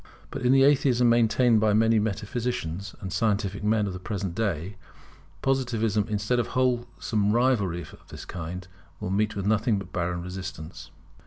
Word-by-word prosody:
But - - -5
in 125 - +3
the 135 0 +6
Atheism 130 -3 +4
maintained 115 0 +4
by 105 -1 +3
many 110 +1 +4
metaphysicians 105 -4 -3
and 95 -2 -5
scientific 100 -2 0
men 105 0 +2
of 100 - -3
the 90 - -6
present 95 -1 -4
day, 95 -2 -2 0.7
Positivism, 115 -6 +1
instead 105 +4 0
of 120 - 0
wholesome 120 -4 0
rivalry 115 -8 +2
of - - -14
this - - -9
kind, 90 +1 -6 0.3
will 90 - -4
meet 105 +2 0
with 100 -1 -3
nothing 110 +1 +2
but 95 -1 -8
barren 85 0 -2
resistance. 85 -3 -7
105 Hz, 160 wpm, -26 LUFS, 95-120 Hz, 0.7 s, the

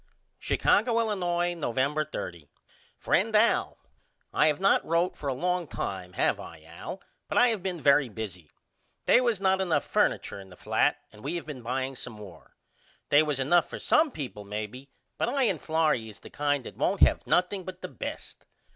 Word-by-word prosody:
Chicago, 230 +2 +2
Illinois, 175 -5 0
November 145 -1 0
30. 85 - -7 0.5
FRIEND 215 +5 +1
AL: 220 +2 +3 0.6
I - - +4
have 150 -2 +1
not 195 +1 +4
wrote 170 +2 +1
for 145 - -4
a - - 0
longtime 140 - -3
have - - +1
I 80 -2 -10
Al 85 - -9 0.2
but - - -2
I 245 - +6
have 220 -4 -1
been 180 -2 -3
very 140 -2 +4
busy. 95 -8 -7 0.6
They - - +6
was 235 -5 +1
not 190 0 +2
enough 175 -4 +1
furniture 100 - 0
in 95 -1 -12
the 90 - -13
flat - - +1
and 105 - -16
we 150 +5 -2
have 170 - -4
been 145 -5 -7
buying 130 +3 -2
some 125 - -7
more. 100 -6 -13 0.5
They 145 - +6
was 150 -3 -1
enough 165 +6 +3
for - - -6
some 315 0 +3
people 130 - -7
maybe 105 +6 -6 0.3
but - - +1
I 270 +1 +1
and 190 -9 +1
Florrie 155 -8 +1
is 105 - -12
the - - -12
kind 145 -2 0
that - - -9
won't - - 0
have - - +3
nothing 185 +2 +1
but 185 +1 -9
the - - -3
best. - - -7
150 Hz, 185 wpm, -28 LUFS, 115-185 Hz, 0.6 s, I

